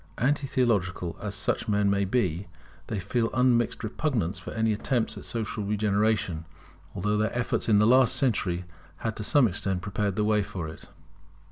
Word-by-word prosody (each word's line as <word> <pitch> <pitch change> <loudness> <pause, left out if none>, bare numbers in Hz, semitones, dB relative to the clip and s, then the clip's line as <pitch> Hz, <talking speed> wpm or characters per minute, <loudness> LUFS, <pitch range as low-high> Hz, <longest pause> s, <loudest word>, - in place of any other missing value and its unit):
Anti 140 +3 +1
theological 95 -9 0
as 100 -1 -3
such 95 - -1
men 105 -1 +2
may 100 0 +2
be, 95 -4 0 0.4
they 110 - -2
feel 115 +5 0
unmixed 120 -2 +2
repugnance 110 - -1
for - - -8
any 110 0 +1
attempts 115 +2 -1
at - - -9
social 110 -2 -3
regeneration, 105 -4 0 0.5
although 105 +3 0
their 110 +3 0
efforts 120 -1 -1
in 105 - +5
the 105 - +5
last 125 +1 +5
century 95 -8 0 0.4
had 110 -1 -1
to 105 - -4
some 130 +4 +4
extent 95 -2 -2
prepared 100 -1 -1
the 105 - +1
way 105 -1 +3
for 95 -5 -5
it. 80 - -10
105 Hz, 170 wpm, -27 LUFS, 100-115 Hz, 0.5 s, in